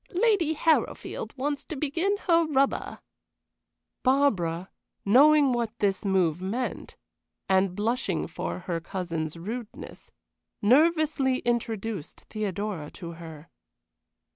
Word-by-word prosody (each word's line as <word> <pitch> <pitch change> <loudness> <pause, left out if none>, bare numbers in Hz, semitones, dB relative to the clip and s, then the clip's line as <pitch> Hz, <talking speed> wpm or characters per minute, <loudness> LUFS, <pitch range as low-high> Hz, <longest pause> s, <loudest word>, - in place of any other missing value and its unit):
"Lady 380 -6 +3
Harrowfield 290 -7 0
wants 285 +2 -2
to 320 - -7
begin 330 +8 0
her 335 -2 +4
rubber." 275 -2 0 1.0
Barbara, 190 -11 +1 0.3
knowing 280 +5 +6
what 235 -1 -2
this 195 -2 0
move 185 -4 +1
meant, 225 +7 -4 0.5
and 190 -1 +2
blushing 230 +6 -1
for - - -5
her 170 -1 -3
cousin's 165 -2 -4
rudeness, 220 +6 -7 0.5
nervously 290 +1 +3
introduced 225 -6 -2
Theodora 200 -6 -3
to 170 -3 -7
her. 165 -2 -11
225 Hz, 100 wpm, -27 LUFS, 185-285 Hz, 1.0 s, knowing